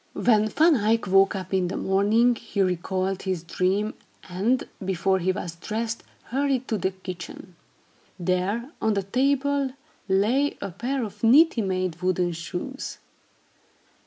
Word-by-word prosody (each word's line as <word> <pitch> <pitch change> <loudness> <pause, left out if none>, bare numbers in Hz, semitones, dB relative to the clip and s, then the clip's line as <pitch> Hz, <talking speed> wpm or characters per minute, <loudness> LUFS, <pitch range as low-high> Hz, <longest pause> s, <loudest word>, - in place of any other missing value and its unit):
When 215 -3 +3
Van 315 +6 +4
Eyck 225 +1 +1
woke 195 +1 +4
up 190 -1 -5
in 185 -2 +2
the 180 - -3
morning, 210 +5 +3
he 225 -2 -6
recalled 185 +1 -1
his 185 -4 -2
dream, 190 +5 0 0.3
and, 205 +8 0 0.2
before 190 0 +1
he 185 +1 +1
was 170 -2 -5
dressed, 220 +5 -3 0.2
hurried 265 0 -1
to 220 - 0
the 190 - +1
kitchen. 185 -1 -9 0.6
There, 190 - -1
on 220 -1 +2
the 200 - 0
table, 275 +4 +1 0.4
lay 230 +10 +2
a 200 - -5
pair 250 +8 -2
of 215 0 -8
neatly 260 +2 +6
made 185 -3 -2
wooden 180 -1 +1
shoes. 175 +11 -5
200 Hz, 140 wpm, -25 LUFS, 185-235 Hz, 0.6 s, neatly